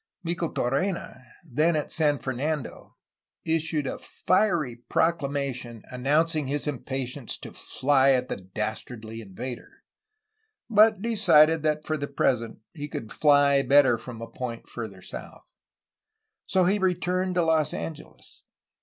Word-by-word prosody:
Micheltorena, 170 0 -1 0.3
then 155 +4 +1
at 150 - -2
San 150 -2 +2
Fernando, 135 +3 -4 0.5
issued 160 -2 0
a - - -4
fiery 170 - 0
proclamation 140 -5 -1
an 125 0 -7
nouncing 155 +2 +2
his 145 +1 -2
impatience 135 -2 -4
to - - -10
fly 135 0 +2
at 130 -1 +3
the - - -3
dastardly 110 +3 -5
invader, 115 +5 -8 0.8
but 215 -2 +5
decided 165 -9 +5
that 150 0 0
for 155 - -1
the 145 -1 -3
present 125 -5 0 0.2
he 145 -3 -6
could 115 -6 -6
''fly" 145 +1 +4
better 135 -1 +5
from 115 0 -8
a - - -6
point 115 0 -6
farther 100 -6 -7
south. - - -9 1.0
So 185 -1 +3
he 200 +3 +2
returned 185 0 0
to 175 -2 +2
Los 160 -2 +2
Angeles. 155 -2 -8
145 Hz, 130 wpm, -26 LUFS, 125-165 Hz, 1.0 s, but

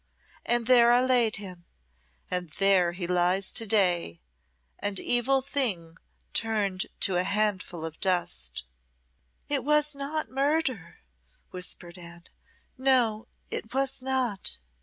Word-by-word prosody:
And 240 -1 +1
there 240 -1 +6
I 245 +1 +4
laid 245 -4 +3
him, 180 -4 -9 0.7
and 180 -2 -1
there 190 -3 +3
he 175 0 -5
lies 180 +2 +1
to 225 - 0
day 180 - +2 0.6
an 205 -1 -2
evil 260 +2 +2
thing 210 - 0 0.4
turned 205 -4 -1
to 190 -3 +2
a 180 - +2
handful 195 -4 -1
of 160 -1 -7
dust." 65 - 0 0.8
"It 285 -4 0
was 300 +1 +2
not 290 +3 -3
murder," 275 - -1 0.5
whispered 180 -1 -4
Anne 170 0 -12 0.6
"no, 240 -4 +2 0.2
it 225 +3 -5
was 270 -1 -1
not." 255 -6 -1
210 Hz, 120 wpm, -27 LUFS, 180-255 Hz, 0.8 s, there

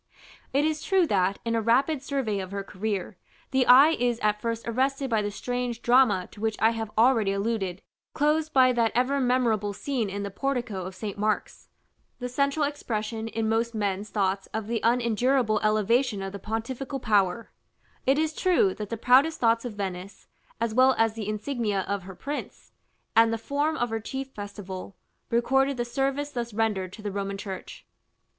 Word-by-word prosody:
It 280 +3 +2
is 310 -1 -1
true 380 -2 +3
that, 195 - +1
in 230 - 0
a 230 - +1
rapid 260 +6 +2
survey 270 -8 -2
of 190 -1 -5
her 200 0 -4
career, 195 -1 -4 0.3
the 265 -1 +2
eye 275 +5 +8
is 245 -6 0
at 210 0 +1
first 230 0 -3
arrested 265 +3 0
by 220 -2 +3
the 205 - -2
strange 245 +2 -3
drama 240 -7 +4
to 210 - -13
which 220 -1 0
I 225 +1 +4
have 225 -1 -4
already 225 -4 +4
alluded, 195 -3 -2 0.3
closed 305 +2 +1
by 255 -2 +5
that 230 -2 +2
ever 260 +3 +2
memorable 235 -5 +1
scene 240 0 -2
in 200 +1 -4
the 200 - -4
portico 240 -6 -2
of 185 0 -7
St. 205 0 -6
Mark's, 215 0 -2 0.5
the 250 - -4
central 280 +3 +1
expression 225 -6 -3
in 225 0 -2
most 225 +1 0
men's 205 -1 -2
thoughts 195 -2 -1
of 220 -1 -2
the 230 +1 -1
unendurable 235 0 +2
elevation 215 +1 +2
of 195 - -4
the 200 - -7
pontifical 245 +6 -4
power; 210 -1 +1 0.6
it 270 +2 +4
is 315 0 0
true 340 - +2
that 210 0 -6
the 230 - -3
proudest 265 +8 +4
thoughts 230 0 +2
of 240 - -4
Venice, 195 -1 -6 0.3
as 230 -1 -1
well 255 +2 +5
as 225 -1 +3
the 215 -2 -5
insignia 215 -2 -1
of 200 +1 -3
her 190 -1 -9
prince, 290 +9 -6 0.4
and 225 0 +6
the 225 - 0
form 290 +7 -1
of 240 -1 -1
her 225 - -1
chief 265 +4 -5
festival, 200 -3 -8 0.3
recorded 270 +3 +2
the 240 - -1
service 275 +3 -1
thus 235 -4 -4
rendered 210 -5 0
to 215 - -11
the 205 - -3
Roman 200 0 -3
Church. 195 -2 -8
225 Hz, 185 wpm, -26 LUFS, 205-260 Hz, 0.6 s, eye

